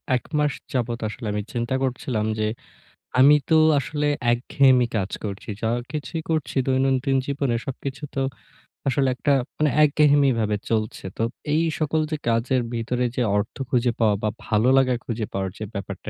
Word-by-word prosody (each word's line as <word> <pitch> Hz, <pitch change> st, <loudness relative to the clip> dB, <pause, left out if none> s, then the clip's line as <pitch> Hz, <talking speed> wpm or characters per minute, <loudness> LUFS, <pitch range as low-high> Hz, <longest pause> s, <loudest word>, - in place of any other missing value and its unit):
১ 125 Hz, -, -2 dB
মাস 150 Hz, -2 st, +2 dB, 0.2 s
যাবত 120 Hz, -2 st, -1 dB
আসলে 115 Hz, +2 st, -8 dB
আমি 105 Hz, -, -1 dB
চিন্তা 120 Hz, +2 st, -1 dB
করছিলাম 125 Hz, -4 st, -1 dB
যে 105 Hz, -, +1 dB, 0.7 s
আমি 145 Hz, +3 st, +8 dB
তো 160 Hz, -, +5 dB, 0.2 s
আসলে 150 Hz, +1 st, -2 dB, 0.3 s
একঘেয়েমি 125 Hz, 0 st, +3 dB
কাজ 95 Hz, -1 st, -1 dB
করছি। 100 Hz, +2 st, -6 dB
যা 110 Hz, -, +1 dB, 0.2 s
কিছুই 155 Hz, +2 st, -4 dB
করছি 155 Hz, -3 st, -1 dB
দৈনন্দিন 135 Hz, 0 st, +2 dB
জীবনে, 140 Hz, -3 st, -1 dB
সবকিছু 135 Hz, +1 st, -5 dB
তো 135 Hz, -, 0 dB, 0.7 s
আসলে 135 Hz, 0 st, +2 dB
একটা 140 Hz, -, 0 dB, 0.3 s
মানে 150 Hz, -1 st, +2 dB
একঘেয়েমি 145 Hz, -1 st, +4 dB
ভাবে 105 Hz, -1 st, +1 dB
চলছে। 110 Hz, -3 st, -1 dB
তো 115 Hz, -, 0 dB, 0.3 s
এই 160 Hz, -, +3 dB, 0.2 s
সকল 155 Hz, +1 st, +1 dB
যে 155 Hz, -, 0 dB
কাজের 120 Hz, +3 st, +1 dB
ভিতরে 125 Hz, +2 st, -1 dB
যে 125 Hz, -, 0 dB, 0.2 s
অর্থ 105 Hz, -, -2 dB
খুঁজে 125 Hz, -2 st, +2 dB
পাওয়া 105 Hz, -3 st, +3 dB
বা, 105 Hz, -, +2 dB, 0.2 s
ভালো 110 Hz, +3 st, +2 dB
লাগা 130 Hz, -2 st, +3 dB
খুঁজে 115 Hz, -2 st, -3 dB
পাওয়ার 95 Hz, -1 st, -1 dB
যে 110 Hz, -, -5 dB
ব্যাপারটা, 100 Hz, -2 st, -6 dB
125 Hz, 165 wpm, -23 LUFS, 115-140 Hz, 0.7 s, আমি